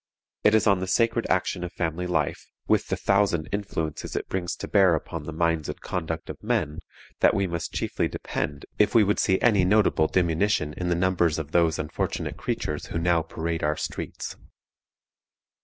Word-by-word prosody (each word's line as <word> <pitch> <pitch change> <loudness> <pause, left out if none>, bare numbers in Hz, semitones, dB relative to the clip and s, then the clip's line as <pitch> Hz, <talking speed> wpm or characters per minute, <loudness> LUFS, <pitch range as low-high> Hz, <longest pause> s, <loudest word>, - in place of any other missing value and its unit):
It 105 - +5
is 110 - +3
on 100 -3 +4
the 95 - -3
sacred 115 +3 +2
action 90 0 0
of 90 - -4
family 85 +1 -2
life, 90 - -1 0.2
with - - +2
the - - 0
thousand 100 -5 +2
influences 95 -7 -3
it - - -2
brings 90 -2 -2
to - - -6
bear 95 -4 +5
upon 80 0 -5
the 80 - -5
minds 80 -1 0
and - - -5
conduct 80 -3 -4
of - - -8
men, 75 +2 -1 0.4
that - - +4
we 100 - +1
must 85 -2 -3
chiefly - - 0
depend 70 -1 -4
if 105 +2 +3
we 115 - +7
would 105 +1 +1
see 95 -2 +2
any 105 -6 +4
notable 95 -5 +3
diminution 85 -2 +1
in 90 +2 -3
the 85 - +2
numbers 85 -3 +2
of 80 -1 -5
those 85 -2 +3
unfortunate 75 - -3
creatures 75 -1 -3
who - - -4
now 85 0 +2
parade 80 +1 -3
our 75 0 0
streets. - - -5
85 Hz, 185 wpm, -26 LUFS, 80-95 Hz, 0.4 s, we